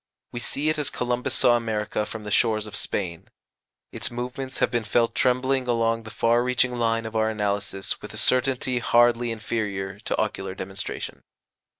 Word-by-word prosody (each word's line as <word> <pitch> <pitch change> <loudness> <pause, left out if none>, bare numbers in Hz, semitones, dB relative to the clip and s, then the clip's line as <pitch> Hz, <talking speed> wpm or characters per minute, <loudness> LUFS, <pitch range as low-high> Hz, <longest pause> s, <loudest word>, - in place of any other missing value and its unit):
We 120 - -4
see 140 +5 -2
it 155 0 0
as 145 - 0
Columbus 125 0 -1
saw 120 - +5
America 105 -2 -1
from 110 -1 -7
the 105 - -6
shores 110 0 +3
of 105 - -6
Spain. 85 -5 -2 0.6
Its - - -2
movements 125 +2 -4
have - - +2
been 120 -1 0
felt 115 +2 +2
trembling 130 +1 +2
along 115 -1 +1
the 110 - -10
far 115 +3 +2
reaching 125 0 +2
line 115 -1 +1
of 110 0 -6
our 110 0 +2
analysis 100 -2 -2
with - - -8
a - - -7
certainty 130 -1 +2
hardly 120 0 +4
inferior 105 -3 -3
to - - -2
ocular 95 -1 -2
demonstration." 95 +1 -5
115 Hz, 175 wpm, -25 LUFS, 105-125 Hz, 0.6 s, saw